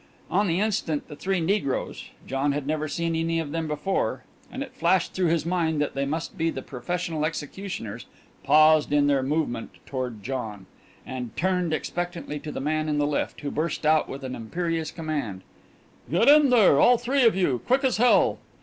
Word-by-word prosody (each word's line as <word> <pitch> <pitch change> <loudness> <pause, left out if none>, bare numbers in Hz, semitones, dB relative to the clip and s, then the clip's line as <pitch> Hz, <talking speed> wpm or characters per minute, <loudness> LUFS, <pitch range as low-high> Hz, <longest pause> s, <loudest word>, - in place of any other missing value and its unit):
On 205 - +2
the 170 +1 +1
instant 195 -8 -1
the 150 - -9
three 190 +4 -1
negroes 165 -5 -1 0.2
John 135 +2 0
had 145 -1 -3
never 155 +1 -1
seen 165 +2 -2
any 165 0 0
of 155 -3 -4
them 165 0 -2
before, 150 +6 -1 0.3
and 265 - -4
it 270 - -11
flashed 175 +2 +1
through 185 -2 +1
his 165 -1 +1
mind 165 -3 0
that 145 - -1
they 140 0 -1
must 160 +3 -4
be 165 +1 +2
the - - -5
professional 160 +4 -3
executioners 155 - -5 0.4
paused 155 +1 +5
in 145 -1 +4
their 140 -2 +3
movement 135 -4 -2
toward 125 -6 -4
John, 110 -6 -5 0.4
and 125 -3 -6
turned 180 -2 +1
expectantly 170 -1 -3
to 150 - -7
the - - -5
man 155 +2 -1
in 150 - 0
the 145 - +2
lift, 145 0 -2
who 145 - -3
burst 155 0 -2
out 155 0 +3
with 135 +1 -7
an 130 -1 -4
imperious 165 +7 -3
command: 150 - -4 0.7
"Get 180 - +2
in 295 0 +8
here! 210 - +6
All 245 0 +6
three 260 +4 0
of 230 -4 +5
you! 145 -10 +1
Quick 260 +3 +3
as 260 -4 +2
hell!" 245 +2 +4
155 Hz, 190 wpm, -25 LUFS, 145-180 Hz, 0.7 s, in